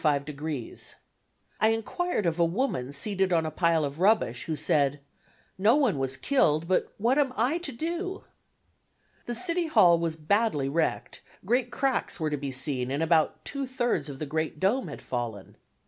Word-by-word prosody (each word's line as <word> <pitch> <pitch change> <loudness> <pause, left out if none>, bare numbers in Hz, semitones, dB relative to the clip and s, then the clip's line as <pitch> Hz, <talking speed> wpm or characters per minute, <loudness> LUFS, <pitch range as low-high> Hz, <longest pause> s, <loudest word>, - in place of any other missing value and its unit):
I 150 - -3
enquired 225 - -1
of 170 0 0
a - - +5
woman 170 - -1
seated 190 +5 0
on 165 -2 +2
a 155 - -3
pile 165 -1 +2
of 140 +2 -6
rubbish, 190 - +2
who 160 - -2
said 145 -1 +2 0.6
"no 215 +6 +5
one 255 - +2
was 135 0 -1
killed, 160 - +2
but 185 - +1
what 240 +7 +2
am 275 -3 +2
I 255 +10 +1
to 340 -5 -4
do?" 345 +8 -4 1.0
The 240 - -1
City 340 +4 -1
Hall 175 - +5
was 165 -1 -1
badly 160 -3 +1
wrecked, 160 +2 -1 0.2
great 245 +4 +1
cracks 260 -7 -1
were 155 -1 -1
to - - +1
be 140 -1 -4
seen 130 -1 -2
and 140 +4 -1
about 160 -1 +2
two 275 -1 -3
thirds 245 - -1
of 140 - -7
the 155 - -4
great 155 +1 -2
dome 225 - +1
had - - -8
fallen. 115 -6 -5
170 Hz, 170 wpm, -27 LUFS, 145-240 Hz, 1.0 s, a